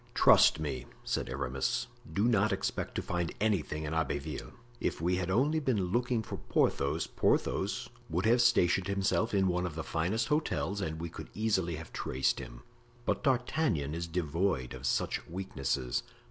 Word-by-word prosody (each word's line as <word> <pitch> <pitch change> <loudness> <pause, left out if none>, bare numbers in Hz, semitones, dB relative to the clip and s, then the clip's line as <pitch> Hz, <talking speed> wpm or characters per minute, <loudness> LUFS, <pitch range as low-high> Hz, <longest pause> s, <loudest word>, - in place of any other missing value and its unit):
"Trust - - +6
me," 70 -5 -3 0.2
said - - -2
Aramis, 70 - -1 0.3
"do 100 - +1
not 110 -2 +3
expect 95 - -2
to - - -1
find 85 -2 -1
anything 95 -7 0
in 75 0 -3
Abbeville. 75 -4 -2 0.3
If - - -1
we 90 +3 +1
had 90 -1 -2
only 140 +11 +3
been 105 -11 0
looking 120 0 +1
for - - -6
Porthos, 70 - +1
Porthos - - 0 0.2
would 90 +5 0
have 120 +2 +5
stationed 95 -6 +4
himself 100 +3 +1
in 95 -2 +3
one 90 0 0
of 80 - -7
the 80 - -3
finest 95 +8 -1
hotels 150 -9 0
and 80 -3 -3
we 85 +1 -4
could - - -9
easily 95 -6 +1
have 80 +1 -9
traced 65 +1 0
him. - - -9 0.4
But - - 0
D'Artagnan 125 - +1
is 85 +1 -3
devoid 85 -4 -1
of 65 0 -4
such - - 0
weaknesses. 70 -8 -2
90 Hz, 165 wpm, -31 LUFS, 75-110 Hz, 0.4 s, Trust